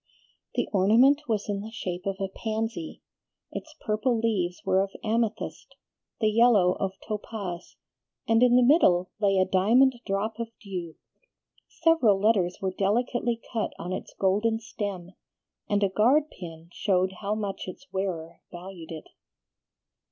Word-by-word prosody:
The - - 0
ornament 245 +10 +4
was 215 -3 -1
in 200 -1 -2
the 215 - -7
shape 185 -5 -5
of 195 0 -2
a 195 - -1
pansy; 225 - -4 0.5
its 315 -1 -7
purple 220 +3 +1
leaves 190 -6 -1
were 190 - +3
of 195 - -1
amethyst, 225 0 -2 0.4
the 215 -2 +2
yellow 215 -5 +5
of 195 -1 -1
topaz, 205 -5 -5 0.5
and 225 +1 +4
in 245 -1 +6
the 250 - +6
middle 190 - +4
lay 200 -2 +3
a 185 - +4
diamond 225 +9 +4
drop 210 +3 -2
of 230 - -2
dew. 180 -5 -6 0.7
Several 325 - +3
letters 195 -4 +2
were 190 -1 -2
delicately 235 +4 0
cut 225 -2 -1
on 180 +2 -5
its - - -6
golden 210 +4 +2
stem, 200 -5 -5 0.6
and 205 0 +2
a - - +5
guard 260 +10 +3
pin 165 -2 -10
showed 185 -2 +1
how 205 +1 -1
much 205 -3 -4
its 185 +9 -9
wearer 170 -4 -3
valued 175 -1 -9
it. 160 -1 -7
205 Hz, 145 wpm, -27 LUFS, 185-230 Hz, 0.7 s, in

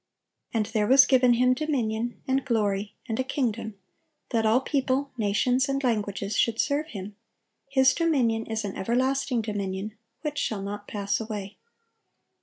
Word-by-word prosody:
And 220 -2 0
there 210 -1 0
was 275 +3 +8
given 255 -3 +5
Him 250 +1 +4
dominion, 240 -5 -2
and 265 0 +1
glory, 210 -5 -1
and 225 +1 -2
a - - +2
kingdom, 230 -5 -2 0.6
that 225 -3 +2
all 225 +3 +4
people, 270 0 -1
nations, 245 +4 +1
and 275 0 -1
languages, 205 -3 -1
should 230 0 +1
serve 295 +2 +1
Him: 205 -6 -8 0.5
His 265 -1 +4
dominion 250 -10 +1
is 220 -1 -2
an 195 - -5
everlasting 255 +2 0
dominion, 200 0 -4 0.3
which 295 -1 -2
shall 205 -3 -2
not 205 +1 -6
pass 200 -1 -1
away." 210 -2 -6
230 Hz, 150 wpm, -26 LUFS, 210-265 Hz, 0.6 s, was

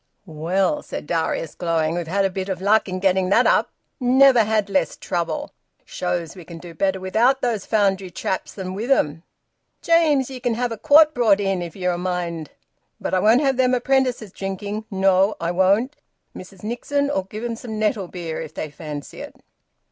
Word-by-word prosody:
"Well," 185 - -1
said - - -7
Darius, 165 -1 -2
glowing, 165 -2 0
"we've 170 -1 -3
had 195 +3 +1
a - - +2
bit 190 +1 -4
o' 190 - 0
luck 205 +2 +2
in 185 - -3
getting 190 -1 +2
that 230 +5 +4
up! - - +3 0.3
Never 255 -1 +5
had 215 -1 +1
less 195 -1 0
trouble! 170 -3 -3 0.3
Shows 175 -2 -3
we 180 - -10
can 170 0 -10
do 170 0 -11
better 190 +2 0
without 225 +8 +2
those 230 -5 -1
Foundry 195 -3 +1
chaps 185 +1 -3
than 185 -2 -5
with 220 +6 -4
'em! 160 - +2 0.6
James, 310 -6 +3
ye 260 - -7
can 245 -2 -1
have 245 +1 -1
a 225 - -4
quart 310 +2 +6
brought 220 -5 +3
in, 195 -2 -1
if 170 -2 -7
ye'n 180 -1 -1
a 175 - -4
mind, 175 -4 -3 0.5
but - - -4
I 185 - +3
won't 225 +7 +4
have 270 -3 +1
them 255 -1 +3
apprentices 250 -4 0
drinking! 200 +3 -5
No, 195 +1 +2
I 170 0 -1
won't! 200 +10 +2 0.4
Mrs 185 +1 -12
Nixon'll 265 -1 -1
give 215 +3 -7
'em 235 -1 -2
some 225 -1 -7
nettle 210 -3 0
beer 170 -3 -5
if 155 - -9
they 155 - -5
fancy 150 -1 -8
it." - - -9
195 Hz, 190 wpm, -22 LUFS, 180-240 Hz, 0.6 s, quart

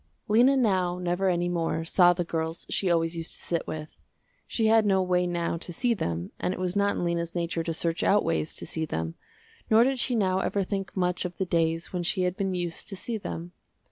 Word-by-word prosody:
Lena 245 +6 +5
now 185 -7 +2
never 180 +1 0
any 175 -1 +1
more 165 -2 -1
saw 175 +1 +5
the 175 0 -1
girls 165 0 -3
she 190 - +1
always 165 0 +1
used 165 -1 -2
to - - -10
sit 170 -1 -1
with. 155 0 -5 0.6
She 225 - 0
had 220 0 +5
no 195 -2 +3
way 180 -1 +1
now 170 -1 -1
to 175 - -8
see 240 +7 +1
them 85 - -3
and 185 - -1
it - - -9
was 185 0 -2
not 200 0 +2
in - - -1
Lena's 170 0 -2
nature 170 -1 -1
to 165 - -2
search 165 +1 -1
out 205 +1 +3
ways 165 -1 -1
to - - -3
see 160 -1 -3
them, 80 - -3 0.6
nor 225 +1 +7
did 265 +1 +1
she 245 0 0
now 190 -4 +2
ever 200 +1 0
think 195 0 -4
much 180 -1 0
of 180 -1 -5
the 190 - 0
days 165 0 0
when 180 - -1
she 185 +2 0
had 180 0 0
been 190 -1 -1
used 175 -2 -4
to 200 - -5
see 220 +4 -4
them. 175 -3 -6
180 Hz, 235 wpm, -27 LUFS, 165-195 Hz, 0.6 s, nor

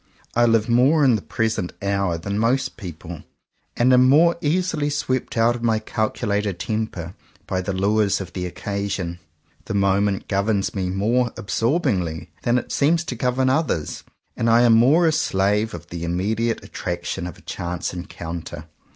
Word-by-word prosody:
I 120 0 +4
live 115 -1 +3
more 135 +6 +4
in 130 - +5
the 105 - -2
present 110 -5 -2
hour 100 -3 0
than 100 +5 -3
most 130 +4 +1
people; 85 -5 -8 0.6
and 125 +2 +4
am 125 0 +6
more 170 +5 +5
easily 155 -1 0
swept 130 -4 -2
out 115 +1 +3
of 120 - -7
my 115 -2 +2
calculated 105 -2 -1
temper 95 -4 -3 0.3
by 95 -1 -2
the 95 - -3
lures 100 +1 +1
of 90 -3 -7
the 90 -1 -3
occasion. 100 -2 -4 0.5
The - - -3
moment 100 0 +1
governs 100 0 0
me 95 -2 -2
more 115 +6 +1
absorbingly 90 - -1
than 120 +1 +2
it 120 - -4
seems 165 +4 +2
to 130 - -5
govern 125 +2 +1
others, 135 - -1 0.3
and 115 - 0
I 115 +1 +5
am 120 -1 +6
more 135 +10 +5
a 160 - +4
slave 105 - +1
of 85 0 -11
the 85 -1 -6
immediate 105 +7 -1
at 105 - -15
traction 85 0 -3
of 90 - -9
a - - -18
chance 85 0 -4
encounter. 85 -2 -7
105 Hz, 170 wpm, -22 LUFS, 95-125 Hz, 0.6 s, am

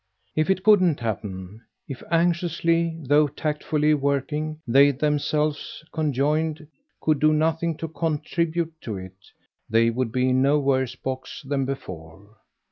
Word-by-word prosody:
If 155 +2 +1
it 190 -1 +1
couldn't 185 -7 +5
happen 105 -2 -5 0.3
if, 135 -3 -7
anxiously, 170 -1 +1
though 145 +2 +4
tactfully 150 +1 0
working, 150 +2 -1
they 135 +4 +6
themselves, 150 +2 -1
conjoined, 155 +1 0 0.3
could 155 -2 +1
do 155 0 +4
nothing 160 +1 +1
to 165 - -4
contribute 165 +1 -2
to 110 -4 -5
it 95 0 -10 0.5
they 115 +1 +3
would 120 -1 -2
be 130 +1 +1
in 130 0 +3
no 140 +2 +4
worse 130 -3 0
a - - -34
box 130 +1 -5
than 135 -1 0
before. 100 -5 -8
150 Hz, 135 wpm, -24 LUFS, 130-160 Hz, 0.5 s, they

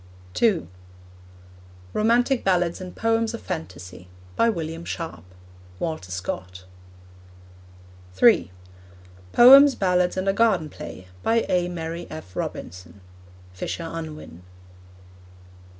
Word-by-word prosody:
(2) 210 -8 +2 1.3
Romantic 240 +4 +2
Ballads 175 -1 +1
and 185 -1 -8
Poems 225 0 0
of - - -9
Phantasy. 90 - -7 0.3
By 230 - +3
William 165 -4 -4
Sharp. 165 - -6 0.5
(Walter 155 - -4
Scott.) 90 0 -6 1.5
(3) 90 -1 +5 0.8
Poems, 275 +3 +8
Ballads, 180 -1 +1
and 185 +1 -2
a 195 - +3
Garden 195 -8 +2
Play. 95 - -9
By 230 - +1
A. 180 -1 +1
Mary 170 -1 -5
F. 155 - -10
Robinson. 90 +2 -6 0.5
(Fisher 165 - -5
Unwin.) 155 - -8
170 Hz, 100 wpm, -24 LUFS, -, 1.5 s, Poems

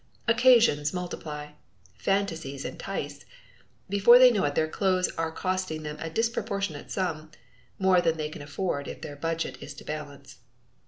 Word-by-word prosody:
Occasions 230 - +4
multiply. 150 -4 -5 0.4
Fantasies 165 -9 -2
entice. - - -5 0.6
Before 200 +5 +7
they 255 0 +8
know 210 -4 +1
it 145 0 -1
their 155 - +2
clothes 185 +2 +1
are 165 0 -1
costing 185 -2 -2
them 150 0 -5
a 165 +1 -4
disproportionate 200 -5 -2
sum 160 -5 -2 0.5
more 190 -2 +4
than 165 -1 +1
they 155 -1 -3
can 155 - -9
afford 145 0 -3
if - - -7
their 145 - -7
budget 165 +2 -3
is - - -8
to - - -11
balance. 145 -3 -8
165 Hz, 150 wpm, -27 LUFS, 150-195 Hz, 0.6 s, they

